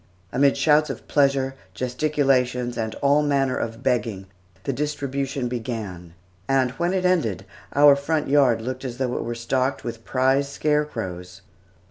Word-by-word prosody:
Amid 140 Hz, +1 st, +3 dB
shouts 150 Hz, 0 st, +3 dB
of -, -, -7 dB
pleasure, 135 Hz, -2 st, +2 dB, 0.2 s
gesticulations, 125 Hz, -1 st, 0 dB
and 110 Hz, -1 st, -3 dB
all 140 Hz, +1 st, +4 dB
manner 140 Hz, -3 st, +1 dB
of 115 Hz, +2 st, -4 dB
begging, 105 Hz, -5 st, 0 dB, 0.4 s
the 140 Hz, -, -1 dB
distribution 140 Hz, -2 st, -2 dB
began, 110 Hz, -8 st, -5 dB, 0.3 s
and 130 Hz, -2 st, +2 dB
when 170 Hz, +6 st, -1 dB
it 185 Hz, -1 st, 0 dB
ended, 160 Hz, -, +1 dB, 0.3 s
our 145 Hz, 0 st, +7 dB
front 150 Hz, +2 st, -1 dB
yard 135 Hz, -5 st, +3 dB
looked 130 Hz, +2 st, -4 dB
as 125 Hz, -2 st, -5 dB
though 125 Hz, -2 st, -1 dB
it -, -, -2 dB
were 120 Hz, 0 st, -4 dB
stocked 130 Hz, +3 st, -1 dB
with 115 Hz, -1 st, -6 dB
prize 135 Hz, +3 st, +1 dB
scarecrows. 115 Hz, -13 st, -2 dB
130 Hz, 145 wpm, -23 LUFS, 120-140 Hz, 0.4 s, our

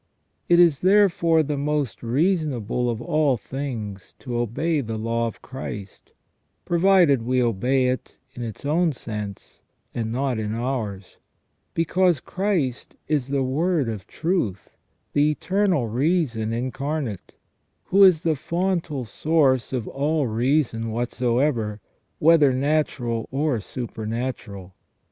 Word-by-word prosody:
It 175 Hz, 0 st, +6 dB
is 170 Hz, -5 st, +5 dB
therefore 180 Hz, -4 st, +4 dB
the 145 Hz, -1 st, -2 dB
most 145 Hz, -3 st, -1 dB
reasonable 125 Hz, -, 0 dB
of 120 Hz, 0 st, -3 dB
all 150 Hz, -3 st, +2 dB
things 115 Hz, -7 st, -6 dB
to 125 Hz, -3 st, -6 dB
obey 145 Hz, +7 st, 0 dB
the 110 Hz, -3 st, -4 dB
law 115 Hz, +1 st, -1 dB
of 115 Hz, -, -9 dB
Christ; 105 Hz, -6 st, -8 dB, 0.5 s
provided 175 Hz, -6 st, +4 dB
we 125 Hz, +2 st, 0 dB
obey 125 Hz, +3 st, +2 dB
it 125 Hz, 0 st, -3 dB, 0.2 s
in 125 Hz, -, -8 dB
its 115 Hz, +2 st, -6 dB
own 160 Hz, +2 st, +2 dB
sense 105 Hz, -5 st, -7 dB, 0.3 s
and 110 Hz, -2 st, -3 dB
not 130 Hz, -1 st, -1 dB
in 110 Hz, 0 st, -2 dB
ours; 115 Hz, -6 st, -4 dB, 0.6 s
because 175 Hz, -1 st, +2 dB
Christ 180 Hz, -, -2 dB
is 145 Hz, -4 st, 0 dB
the 140 Hz, -1 st, 0 dB
Word 150 Hz, +2 st, +1 dB
of 105 Hz, -4 st, -6 dB
truth, 160 Hz, -, -2 dB, 0.4 s
the 145 Hz, +1 st, +4 dB
Eternal 180 Hz, -, +1 dB
Reason 125 Hz, -3 st, 0 dB
Incarnate, 130 Hz, -, -3 dB, 0.5 s
who 195 Hz, +2 st, +4 dB
is 180 Hz, -5 st, +6 dB
the 160 Hz, -2 st, +2 dB
fontal 170 Hz, -3 st, -2 dB
source 135 Hz, +1 st, +1 dB
of 125 Hz, -4 st, -2 dB
all 150 Hz, +1 st, 0 dB
reason 120 Hz, 0 st, 0 dB
whatsoever, 120 Hz, -1 st, 0 dB, 0.4 s
whether 150 Hz, -3 st, +5 dB
natural 130 Hz, -4 st, 0 dB
or 140 Hz, -2 st, 0 dB
supernatural. 110 Hz, -4 st, -5 dB
130 Hz, 120 wpm, -24 LUFS, 115-155 Hz, 0.6 s, It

